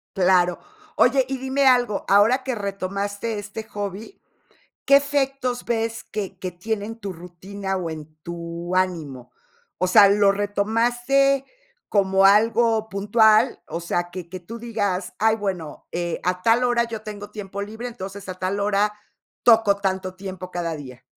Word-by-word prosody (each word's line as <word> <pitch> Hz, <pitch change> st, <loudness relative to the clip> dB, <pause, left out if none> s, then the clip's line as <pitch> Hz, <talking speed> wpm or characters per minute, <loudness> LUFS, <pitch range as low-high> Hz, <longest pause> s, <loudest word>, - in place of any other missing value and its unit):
Claro. 180 Hz, -2 st, +3 dB, 0.4 s
Oye, 260 Hz, +2 st, +4 dB
y 270 Hz, 0 st, -3 dB
dime 265 Hz, +1 st, 0 dB
algo, 245 Hz, -5 st, +3 dB
ahora 220 Hz, +7 st, +4 dB
que 260 Hz, -, -1 dB
retomaste 200 Hz, +1 st, -3 dB
este 210 Hz, +2 st, -7 dB
hobby, 205 Hz, -, -7 dB, 0.7 s
¿qué 275 Hz, -, +6 dB
efectos 275 Hz, -3 st, 0 dB
ves 230 Hz, -1 st, -2 dB
que 210 Hz, -3 st, -5 dB
que 185 Hz, -, -4 dB
tiene 205 Hz, +4 st, -3 dB
en 225 Hz, +1 st, -6 dB
tu 200 Hz, -3 st, -5 dB
rutina 185 Hz, +3 st, -6 dB
o 180 Hz, -3 st, -3 dB
en 155 Hz, -1 st, -9 dB
tu 170 Hz, +1 st, -6 dB
ánimo? 155 Hz, -9 st, -2 dB, 0.5 s
O 185 Hz, -, +1 dB
sea, 205 Hz, +1 st, +8 dB
¿lo 200 Hz, 0 st, +4 dB
retomaste 240 Hz, +7 st, +1 dB, 0.5 s
como 195 Hz, -1 st, +3 dB
algo 220 Hz, +2 st, +4 dB
puntual? 215 Hz, +4 st, +3 dB
O 170 Hz, -, -5 dB
sea, 175 Hz, +1 st, -2 dB
que 175 Hz, -1 st, -7 dB
que 185 Hz, +1 st, -7 dB
tú 225 Hz, +7 st, -9 dB
digas: 205 Hz, -5 st, -2 dB
"Ay, 220 Hz, +1 st, +4 dB
bueno, 190 Hz, -7 st, -5 dB
eh, 175 Hz, -1 st, -3 dB
a 180 Hz, 0 st, -1 dB
tal 230 Hz, +4 st, +3 dB
hora 240 Hz, -1 st, +2 dB
yo 225 Hz, -2 st, -6 dB
tengo 205 Hz, -1 st, -8 dB
tiempo 200 Hz, -1 st, -6 dB
libre, 220 Hz, +4 st, -6 dB
entonces 195 Hz, -3 st, -8 dB
a 185 Hz, -, -4 dB
tal 185 Hz, +2 st, -2 dB
hora 205 Hz, +1 st, +1 dB, 0.5 s
toco 225 Hz, -4 st, +5 dB
tanto 190 Hz, -1 st, -2 dB
tiempo 185 Hz, -1 st, -8 dB
cada 170 Hz, -2 st, -2 dB
día". 130 Hz, -4 st, -11 dB
200 Hz, 155 wpm, -23 LUFS, 185-225 Hz, 0.7 s, sea